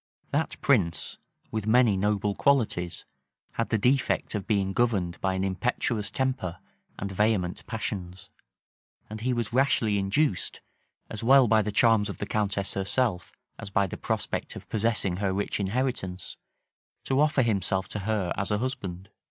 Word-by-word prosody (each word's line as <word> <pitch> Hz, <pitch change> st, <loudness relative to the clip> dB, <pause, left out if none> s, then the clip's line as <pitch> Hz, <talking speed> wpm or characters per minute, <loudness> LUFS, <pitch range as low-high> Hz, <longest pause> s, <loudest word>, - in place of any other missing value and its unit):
That 160 Hz, +3 st, -1 dB
prince, 100 Hz, -12 st, +1 dB, 0.3 s
with 110 Hz, -1 st, -3 dB
many 115 Hz, -2 st, +5 dB
noble 105 Hz, +1 st, +1 dB
qualities 110 Hz, -10 st, +1 dB, 0.5 s
had 115 Hz, -, -2 dB
the 110 Hz, -, +2 dB
defect 125 Hz, +5 st, +1 dB
of 105 Hz, -3 st, -3 dB
being 100 Hz, -3 st, +1 dB
governed 100 Hz, -7 st, 0 dB
by 95 Hz, -1 st, +1 dB
an 95 Hz, -, -1 dB
impetuous 105 Hz, +2 st, -1 dB
temper 130 Hz, -9 st, -2 dB, 0.4 s
and 100 Hz, 0 st, -4 dB
vehement 95 Hz, -3 st, 0 dB
passions; 100 Hz, -4 st, -5 dB, 0.8 s
and 110 Hz, 0 st, -6 dB
he 125 Hz, +2 st, 0 dB
was 120 Hz, -2 st, -2 dB
rashly 115 Hz, -5 st, +2 dB
induced, 100 Hz, -, 0 dB, 0.5 s
as 110 Hz, -, -5 dB
well 130 Hz, +1 st, +6 dB
by 110 Hz, 0 st, +4 dB
the 105 Hz, 0 st, -2 dB
charms 110 Hz, -1 st, +4 dB
of -, -, -6 dB
the -, -, -3 dB
countess 100 Hz, -2 st, -1 dB
herself, 100 Hz, 0 st, 0 dB, 0.3 s
as -, -, -7 dB
by 100 Hz, 0 st, +2 dB
the 95 Hz, -, -5 dB
prospect -, -, -3 dB
of -, -, -10 dB
possessing 105 Hz, -4 st, +1 dB
her 100 Hz, -1 st, 0 dB
rich 100 Hz, +2 st, -1 dB
inheritance, 100 Hz, -3 st, -2 dB, 0.7 s
to 135 Hz, 0 st, +1 dB
offer 150 Hz, -3 st, +3 dB
himself 95 Hz, -4 st, 0 dB
to 105 Hz, -, -4 dB
her 100 Hz, -3 st, -1 dB
as 100 Hz, -, -1 dB
a 105 Hz, -, +1 dB
husband. 95 Hz, -6 st, -4 dB
105 Hz, 155 wpm, -27 LUFS, 95-120 Hz, 0.8 s, well